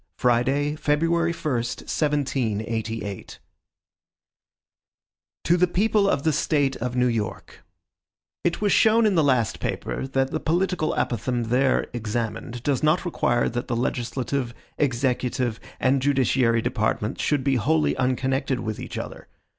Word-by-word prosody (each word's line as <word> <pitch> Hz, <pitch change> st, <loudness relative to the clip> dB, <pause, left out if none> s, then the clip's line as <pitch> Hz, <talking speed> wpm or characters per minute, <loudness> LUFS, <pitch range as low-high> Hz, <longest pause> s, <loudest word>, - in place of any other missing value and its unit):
Friday, 135 Hz, +5 st, +1 dB
February 165 Hz, +3 st, +1 dB
1, 170 Hz, 0 st, -9 dB
1788. 115 Hz, -4 st, -1 dB
MADISON 100 Hz, -2 st, -8 dB, 2.0 s
To 170 Hz, -, +3 dB
the 180 Hz, +1 st, +4 dB
People 200 Hz, +2 st, +2 dB
of 140 Hz, -, 0 dB
the 160 Hz, -, +2 dB
State 140 Hz, -2 st, +1 dB
of 125 Hz, +1 st, -3 dB
New 125 Hz, 0 st, +3 dB
York: 115 Hz, -4 st, -3 dB, 0.8 s
IT 175 Hz, -, 0 dB
WAS 205 Hz, -1 st, +2 dB
shown 225 Hz, +1 st, +5 dB
in 210 Hz, -, +3 dB
the 165 Hz, -4 st, +3 dB
last 125 Hz, -6 st, +1 dB
paper -, -, -3 dB
that 135 Hz, 0 st, 0 dB
the 155 Hz, -, -1 dB
political 175 Hz, 0 st, 0 dB
apothegm 120 Hz, 0 st, -1 dB
there 130 Hz, +2 st, +2 dB
examined 120 Hz, +1 st, -4 dB
does 140 Hz, -2 st, 0 dB
not 155 Hz, +4 st, +2 dB
require 120 Hz, -8 st, +1 dB
that 120 Hz, +1 st, -3 dB
the 120 Hz, -, -1 dB
legislative, 125 Hz, +1 st, -2 dB, 0.2 s
executive, 125 Hz, -3 st, 0 dB, 0.2 s
and 130 Hz, +1 st, +2 dB
judiciary 130 Hz, -4 st, +2 dB
departments 110 Hz, -3 st, -1 dB
should 145 Hz, -3 st, +1 dB
be 135 Hz, -1 st, +2 dB
wholly 75 Hz, -8 st, +2 dB
unconnected 130 Hz, +1 st, 0 dB
with 110 Hz, -2 st, -4 dB
each -, -, -6 dB
other. -, -, -7 dB
130 Hz, 135 wpm, -24 LUFS, 120-150 Hz, 2.0 s, shown